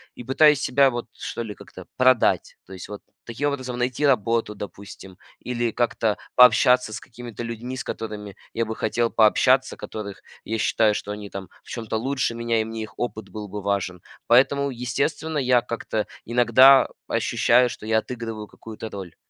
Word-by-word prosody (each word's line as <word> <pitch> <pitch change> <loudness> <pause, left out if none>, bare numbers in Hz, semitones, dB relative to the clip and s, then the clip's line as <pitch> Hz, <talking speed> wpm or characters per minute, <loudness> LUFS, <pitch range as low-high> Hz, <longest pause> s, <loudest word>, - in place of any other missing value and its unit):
и - - -9
пытаюсь 150 +3 +4
себя 135 +1 +4
вот 120 -1 -4
что 120 - -5
ли 105 -2 -6
как-то - - -13
продать. 130 -2 +3
То 95 - -12
есть 95 +1 -9
вот 105 - -8 0.2
таким 130 +5 -2
образом 130 -3 -4
найти 125 +4 0
работу, 115 -4 +1
допустим, 100 -2 -10 0.2
или 120 -2 -2
как-то 115 -2 0 0.2
пообщаться 125 -1 +5
с 110 - -5
какими-то 120 -1 -10
людьми, 120 +2 -5
с 130 - -5
которыми 105 -3 -6 0.2
я 115 - 0
бы 110 0 -5
хотел 115 +2 0
пообщаться, 125 +4 +3
которых 100 -2 -7 0.2
я 110 +1 -3
считаю, 110 0 +2
что 105 - -4
они 105 0 -7
там 95 -1 -7
в - - -17
чем-то 115 -2 -3
лучше 130 0 -1
меня 115 -1 0
и - - 0
мне 110 0 -5
их 110 - -10
опыт 110 -4 -4
был 105 -1 -7
бы 105 +1 -6
важен. 95 -3 -2 0.3
Поэтому, 140 +3 +4
естественно, 140 +5 -2
я 125 -2 +3
как-то 115 -2 -3 0.2
иногда 125 +3 +6 0.2
ощущаю, 125 +1 +3
что 110 - -9
я 110 0 +2
отыгрываю 115 -2 -5
какую-то 110 +1 -9
роль. 95 -5 -8
115 Hz, 175 wpm, -23 LUFS, 105-125 Hz, 0.3 s, иногда